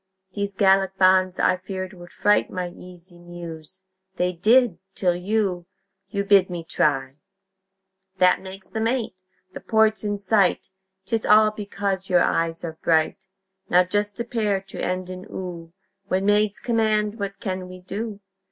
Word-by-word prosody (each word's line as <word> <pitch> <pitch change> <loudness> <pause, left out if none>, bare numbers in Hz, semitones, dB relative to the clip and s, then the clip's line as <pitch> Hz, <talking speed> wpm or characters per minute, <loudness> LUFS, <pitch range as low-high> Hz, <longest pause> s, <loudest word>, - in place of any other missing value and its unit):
These 200 -1 -3
Gallic 195 -1 +3
bonds, 185 -1 +4
I 185 - +2
feared, 185 +1 -6
would 175 -1 -12
fright 205 0 +2
My 180 -1 -4
easy 175 0 -13
Muse. 175 +1 -10 0.3
They 180 +1 0
did, 220 +1 +3 0.2
till 180 -2 +1
you 185 -2 -1 0.4
You 200 -1 -1
bid 200 -2 +4
me 175 -2 -5
try! 135 -4 0 1.0
That 180 -1 +4
makes 190 0 -10
them 220 0 -1
eight. 235 -4 -1 0.4
The - - -7
port's 220 -1 +2
in 205 -1 -1
sight 200 -1 +1 0.4
'Tis 225 +2 -1
all 215 0 +5
because 200 -2 -3
your 180 -1 +4
eyes 165 0 0
are 160 -1 -6
bright! 160 +2 +1 0.4
Now 180 +1 +5
just 205 +4 -2
a - - 0
pair 215 -4 0
to - - -6
end 185 0 -2
in 185 0 -8
"oo" 170 -3 -7 0.4
When 190 0 0
maids 210 0 +2
command, 220 -2 0
what 200 -1 -4
can't 185 -2 -4
we 185 0 -11
do? 205 +3 -5
190 Hz, 155 wpm, -23 LUFS, 180-210 Hz, 1.0 s, all